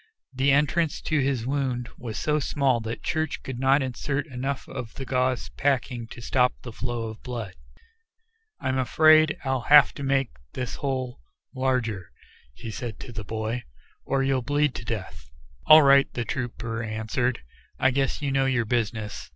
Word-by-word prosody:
The 135 Hz, +2 st, +1 dB
entrance 150 Hz, +3 st, +2 dB
to 155 Hz, -2 st, +1 dB
his 135 Hz, -4 st, 0 dB
wound 130 Hz, -3 st, -1 dB
was 115 Hz, -4 st, -6 dB
so 150 Hz, 0 st, +1 dB
small 135 Hz, -4 st, +1 dB
that 115 Hz, +1 st, -6 dB
Church 155 Hz, -2 st, -2 dB
could 130 Hz, -2 st, -6 dB
not 135 Hz, +2 st, +4 dB
insert 140 Hz, +3 st, -2 dB
enough 135 Hz, -1 st, -4 dB
of 125 Hz, -4 st, -7 dB
the 135 Hz, -, -6 dB
gauze 130 Hz, -1 st, 0 dB
packing 125 Hz, -4 st, -1 dB
to 120 Hz, -, -10 dB
stop 125 Hz, +1 st, +2 dB
the 120 Hz, -, -7 dB
flow 120 Hz, 0 st, -3 dB
of 110 Hz, -, -10 dB
blood. 115 Hz, -7 st, -5 dB, 1.1 s
"I'm 130 Hz, 0 st, -1 dB
afraid 155 Hz, +3 st, +5 dB
I'll 130 Hz, -1 st, 0 dB
have 145 Hz, -1 st, +8 dB
to -, -, -8 dB
make 135 Hz, -2 st, +1 dB, 0.2 s
this 125 Hz, -2 st, -4 dB
hole 130 Hz, -, -3 dB, 0.3 s
larger," 125 Hz, -7 st, -1 dB, 0.5 s
he 110 Hz, -, -7 dB
said 120 Hz, -1 st, -6 dB
to 125 Hz, -, -8 dB
the 105 Hz, -2 st, -6 dB
boy, 110 Hz, +3 st, -3 dB, 0.4 s
"or 135 Hz, 0 st, 0 dB
you'll 135 Hz, -1 st, +1 dB
bleed 145 Hz, +2 st, +1 dB
to 115 Hz, -, -7 dB
death." 100 Hz, -, -6 dB, 0.4 s
"All 155 Hz, 0 st, +10 dB
right," 140 Hz, 0 st, +5 dB
the 120 Hz, -, -2 dB
trooper 115 Hz, -2 st, -4 dB
answered, 110 Hz, -, -2 dB, 0.3 s
"I 130 Hz, -, +3 dB
guess 135 Hz, +2 st, -1 dB
you 140 Hz, -, 0 dB
know 135 Hz, 0 st, +2 dB
your 125 Hz, -3 st, +1 dB
business." 110 Hz, -2 st, -2 dB
130 Hz, 165 wpm, -26 LUFS, 115-140 Hz, 1.1 s, All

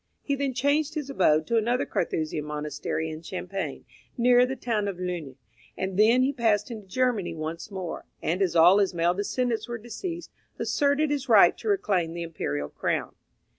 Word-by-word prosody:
He 280 Hz, -, -1 dB
then 275 Hz, -2 st, -1 dB
changed 285 Hz, +4 st, +1 dB
his 290 Hz, -3 st, -3 dB
abode 155 Hz, -, +3 dB
to 230 Hz, -, +1 dB
another 240 Hz, +3 st, +1 dB
Carthusian 155 Hz, -2 st, -2 dB
monastery 150 Hz, +1 st, -3 dB
in 155 Hz, 0 st, -7 dB
Champagne, 185 Hz, +3 st, -5 dB, 0.3 s
near 245 Hz, +1 st, +5 dB
the 265 Hz, -, -3 dB
town 225 Hz, -5 st, -1 dB
of 195 Hz, -3 st, -4 dB
Luni, 175 Hz, -7 st, -5 dB, 0.4 s
and 190 Hz, 0 st, -2 dB
thence 225 Hz, +5 st, +5 dB
he 275 Hz, +2 st, +1 dB
passed 230 Hz, -2 st, +1 dB
into 215 Hz, -4 st, -8 dB
Germany 220 Hz, -7 st, 0 dB
once 160 Hz, +4 st, -5 dB
more, 185 Hz, -4 st, -6 dB
and 175 Hz, +4 st, -1 dB
as 180 Hz, -3 st, +1 dB
all 175 Hz, +4 st, +7 dB
his 195 Hz, -3 st, +1 dB
male 170 Hz, +1 st, +2 dB
descendants 230 Hz, +5 st, -1 dB
were 235 Hz, -1 st, -4 dB
deceased, 335 Hz, -, -6 dB, 0.3 s
asserted 290 Hz, +1 st, +1 dB
his 275 Hz, -3 st, -2 dB
right 200 Hz, -6 st, +7 dB
to -, -, -7 dB
reclaim 195 Hz, -, +1 dB
the 170 Hz, 0 st, -4 dB
imperial 75 Hz, -, -3 dB
crown. -, -, -2 dB
205 Hz, 175 wpm, -26 LUFS, 170-255 Hz, 0.4 s, all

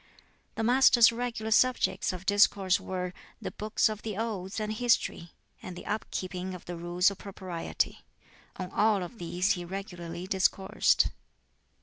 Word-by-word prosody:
The 225 Hz, -, -2 dB
Master's 240 Hz, -1 st, +6 dB
regular 230 Hz, -2 st, -3 dB
subjects 255 Hz, 0 st, +2 dB
of 185 Hz, 0 st, -8 dB
discourse 200 Hz, -2 st, +4 dB
were 180 Hz, -1 st, -4 dB, 0.3 s
the -, -, -5 dB
"Books 215 Hz, +1 st, +1 dB
of 215 Hz, -1 st, -4 dB
the 215 Hz, -3 st, -5 dB
Odes" 210 Hz, -3 st, -3 dB
and 215 Hz, 0 st, -2 dB
"History," 230 Hz, -7 st, +1 dB, 0.3 s
and 185 Hz, -, -8 dB
the -, -, -9 dB
up 210 Hz, +1 st, -3 dB
keeping 185 Hz, 0 st, -4 dB
of 180 Hz, -, -11 dB
the 175 Hz, -, -5 dB
Rules 175 Hz, +3 st, +2 dB
of 200 Hz, -, -10 dB
Propriety. 185 Hz, -4 st, -4 dB, 0.5 s
On 185 Hz, -1 st, -6 dB
all 210 Hz, -3 st, +2 dB
of 200 Hz, +6 st, -9 dB
these 180 Hz, +3 st, 0 dB
he 175 Hz, -, -1 dB
regularly 175 Hz, -2 st, -6 dB
discoursed. 190 Hz, 0 st, +2 dB
195 Hz, 150 wpm, -29 LUFS, 180-220 Hz, 0.5 s, Master's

